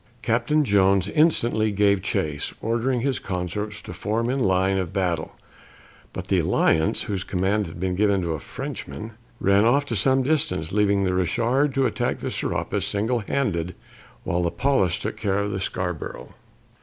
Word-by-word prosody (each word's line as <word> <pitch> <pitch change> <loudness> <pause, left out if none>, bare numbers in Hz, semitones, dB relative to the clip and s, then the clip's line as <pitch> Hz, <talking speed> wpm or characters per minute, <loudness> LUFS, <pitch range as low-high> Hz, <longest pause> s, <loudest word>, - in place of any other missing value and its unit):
Captain 125 +7 +2
Jones 100 -2 +3
instantly 120 -7 +2
gave 100 -1 +3
chase, 75 -3 -2
ordering 120 +2 0
his 130 -3 0
consorts 105 +3 -4
to - - -8
form 110 +7 -1
in 135 - -1
line 95 -3 +2
of 95 -2 -3
battle, 90 -5 -1 0.8
but - - -6
the - - +2
Alliance, 80 0 +2
whose 95 -3 -3
command 95 +2 0
had 80 +1 -9
been 95 0 -1
given 100 +1 +2
to 85 - -1
a 80 - -4
Frenchman, 110 +8 -7 0.3
ran 100 +1 +4
off 140 +5 +3
to 120 - -3
some 130 +5 +3
distance, 140 - 0
leaving 100 -1 +2
the 95 -1 +1
Richard 120 - +1
to 135 -1 +2
attack - - -1
the - - -4
Serapis - - -2
single 110 +4 0
handed, 90 -7 -1 0.5
while 90 +1 0
the 85 - +1
Pallas 135 -7 +1
took - - -4
care 95 -1 0
of 100 0 -1
the 95 - -2
Scarborough. 90 -4 -4
100 Hz, 170 wpm, -24 LUFS, 90-120 Hz, 0.8 s, ran